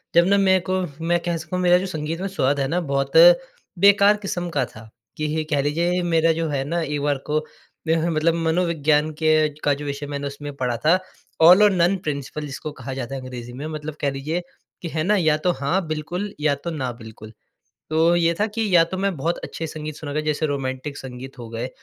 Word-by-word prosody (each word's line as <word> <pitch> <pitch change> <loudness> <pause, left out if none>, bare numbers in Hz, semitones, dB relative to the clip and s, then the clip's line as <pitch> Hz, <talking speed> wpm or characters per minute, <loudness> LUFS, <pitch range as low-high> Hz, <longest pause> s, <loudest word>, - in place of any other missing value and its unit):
जब 170 0 +6
ना 200 0 +4
मेरे 190 -1 +4
को, 185 0 +1 0.2
मैं 175 +1 +1
कह 170 -1 0
सकता 155 +3 -6
हूँ 180 - -1
मेरा 180 0 +6
जो 185 - -2
संगीत 160 -1 -4
में 195 - -1
स्वाद 145 -7 0
है 135 - 0
ना 175 +5 0
बहुत 135 0 0 0.7
बेकार 200 +2 +6
किस्म 175 -4 -4
का - - +2
था। 110 0 -14 0.3
कि 155 0 -1
ही 155 - -2
ये 155 - 0
कह 145 -2 +2
लीजिए 170 +5 0
मेरा 165 -1 +3
जो 165 0 -2
है 135 -2 -1
ना 170 +4 -1
एक 145 -2 -2
बार 145 -1 +1
को 150 +1 +1 0.5
मेरा 165 +1 +2
मतलब 165 +1 +2
मनोविज्ञान 160 -2 +1
के 155 0 +3
का 145 - +3
जो 145 +1 -6
विषय 140 0 -4
मैंने 140 0 -3
उसमें 145 +1 -7
पढ़ा 125 -3 -1
था 170 +4 +6 0.5
ऑल 180 +4 +8
और 210 - +6
नन 180 +1 +3
प्रिंसिपल 150 0 -4
जिसको 145 +2 -6
कहा 135 -2 -7
जाता 130 0 -5
है 135 - -5
अंग्रेज़ी 120 -2 -8
में। 135 +4 -6
मतलब 155 -1 -6
कह 140 - +2
लीजिए 150 +6 -3 0.4
कि 170 - -4
है 155 0 -2
ना 205 +5 +3
या 160 -6 +3
तो 180 +3 +1
हाँ 170 +6 0
बिल्कुल 175 +6 -4
या 150 -1 +2
तो 155 +5 -6
ना 130 -6 -3
बिल्कुल। 110 -2 -12 0.6
तो 165 +2 +3
ये 170 -1 +3
था 210 - +3
कि 220 0 -2
या 165 - +7
तो 185 - -6
मैं 195 -3 0
बहुत 165 +5 -1
अच्छे 165 - -5
संगीत 155 -1 -6
सुनूँगा 150 -1 -3
जैसे 155 0 -1
रोमांटिक 140 0 -4
संगीत 130 +1 -9
हो 115 -2 -8
गए। 115 +2 -4
155 Hz, 230 wpm, -22 LUFS, 140-175 Hz, 0.7 s, ऑल